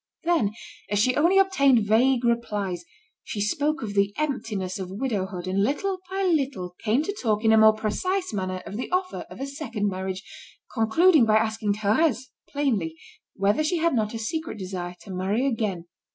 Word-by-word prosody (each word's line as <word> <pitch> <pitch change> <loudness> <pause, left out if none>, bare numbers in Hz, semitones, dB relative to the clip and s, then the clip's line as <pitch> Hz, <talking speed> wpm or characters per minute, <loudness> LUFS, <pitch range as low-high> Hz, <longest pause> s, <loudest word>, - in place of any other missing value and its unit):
Then, 325 -12 +2 0.4
as 205 - 0
she 255 +5 +3
only 340 +6 +4
obtained 280 - +4
vague 240 +4 +3
replies, 205 -7 -1 0.4
she 210 - -5
spoke 295 +9 0
of 205 -2 -4
the 200 0 +1
emptiness 215 -11 -2
of 185 -1 -5
widowhood, 195 -4 -3
and 190 +1 0
little 370 - -1
by 385 +1 -2
little 275 - 0
came 230 +7 +2
to 400 +5 -3
talk 215 -2 0
in 220 - +6
a - - +6
more 220 0 +7
precise 365 - -2
manner 185 -2 -3
of 205 - -6
the 250 - -4
offer 365 0 -2
of - - -11
a 270 - -2
second 245 -8 -3
marriage, 190 0 -4 0.5
concluding 280 +7 +4
by 215 -1 +4
asking 220 -1 0
Thérèse, 235 +5 +1 0.2
plainly, 225 - -1 0.4
whether 205 +9 +2
she 340 +3 0
had 335 -1 +2
not 220 -2 0
a - - -2
secret 315 +5 -4
desire 180 -2 -5
to 195 - -10
marry 195 +7 0
again. 215 -9 -1
220 Hz, 180 wpm, -25 LUFS, 200-285 Hz, 0.5 s, more